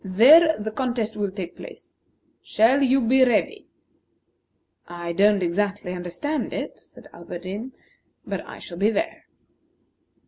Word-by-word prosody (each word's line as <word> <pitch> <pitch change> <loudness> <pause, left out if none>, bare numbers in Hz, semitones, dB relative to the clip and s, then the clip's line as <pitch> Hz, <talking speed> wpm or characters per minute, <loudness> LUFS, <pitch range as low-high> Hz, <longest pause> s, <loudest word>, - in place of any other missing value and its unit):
There 290 - +6
the 215 +1 -5
contest 235 -2 -2
will 205 -1 -2
take 185 -3 -7
place. - - -13 0.5
Shall 245 +6 +2
you 270 0 +3
be 260 +3 +4
ready?" 255 - 0 1.2
"I 175 0 -6
don't 200 +1 +3
exactly 200 +1 -2
understand 180 - -4
it," - - -5
said - - -17
Alberdin, 185 +9 -8 0.5
"but - - -4
I - - -11
shall 170 -1 -10
be 205 +2 +3
there." 325 +8 -3
210 Hz, 130 wpm, -23 LUFS, 185-260 Hz, 1.2 s, There